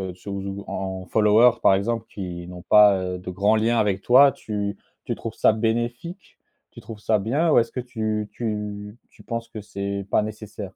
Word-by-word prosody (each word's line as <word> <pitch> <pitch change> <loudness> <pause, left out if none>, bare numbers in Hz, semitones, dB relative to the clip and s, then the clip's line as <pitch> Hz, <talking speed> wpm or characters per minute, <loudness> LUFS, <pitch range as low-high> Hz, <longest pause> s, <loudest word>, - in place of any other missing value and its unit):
sur 100 +2 -8
z 95 - -7
ou 100 +1 -6
en 95 -1 -5
followers, 110 +4 +4
par - - +6
exemple, 115 +3 -2
qui 90 -3 -7
n'ont 90 0 -9
pas, 105 -2 +6
heu, 90 0 -3
de 90 - -8
grands 100 +4 +2
liens 115 +2 +2
avec 100 -2 0
toi, 135 +3 +7
tu 105 -3 -4 0.3
tu - - -2
trouves - - -6
ça - - +4
bénéfique? 120 - -3 0.3
Tu - - -12
trouves 110 -2 -10
ça 105 0 +1
bien 145 +11 +1
ou - - +6
est-ce 115 - -1
que - - -5
tu 110 -3 -3
tu 105 -2 -5
tu - - -19
penses 115 -1 -5
que 110 -2 -8
c'est 100 -1 -5
pas - - +3
nécessaire? 105 -2 -7
105 Hz, 200 wpm, -23 LUFS, 100-115 Hz, 0.3 s, toi